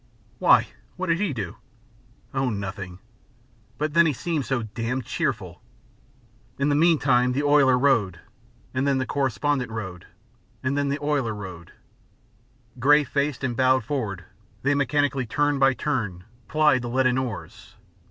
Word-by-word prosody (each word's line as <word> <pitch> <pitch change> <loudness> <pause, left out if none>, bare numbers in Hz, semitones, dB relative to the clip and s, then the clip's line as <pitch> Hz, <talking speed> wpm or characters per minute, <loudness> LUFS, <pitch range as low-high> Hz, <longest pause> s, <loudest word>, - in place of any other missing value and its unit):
"Why? - - +5 0.3
What 185 -1 -4
did 165 +1 +2
he 205 -4 0
do?" 105 -9 -5 0.8
"Oh, 135 -1 0
nothing, 100 -3 -5 0.8
but 150 0 -2
then 170 0 +5
he 150 - +1
seemed 155 -1 -2
so 130 -4 0
damned 115 +3 -3
cheerful." 115 - -3 1.0
In 140 +1 +1
the - - +2
meantime 135 -6 +3
the 140 +3 -1
oiler 145 -3 +5
rowed, 115 -10 +2 0.5
and 130 +2 0
then 140 -1 +2
the 130 - -1
correspondent 135 -1 -1
rowed, 95 -6 -6 0.6
and 130 +2 0
then 145 -1 0
the 140 - 0
oiler 140 -7 0
rowed. 90 -4 -9 1.1
Grey 145 +4 +5
faced 140 +1 -2
and 120 -2 -1
bowed 130 +1 +3
forward, 110 -11 -3 0.4
they 140 +2 +3
mechanically, 140 -2 +1
turn 145 +3 +1
by 135 -1 +4
turn, 110 -13 -2 0.2
plied 155 -4 +3
the 120 - -5
leaden 130 0 +2
oars. 120 -6 -7
130 Hz, 145 wpm, -24 LUFS, 115-145 Hz, 1.1 s, Why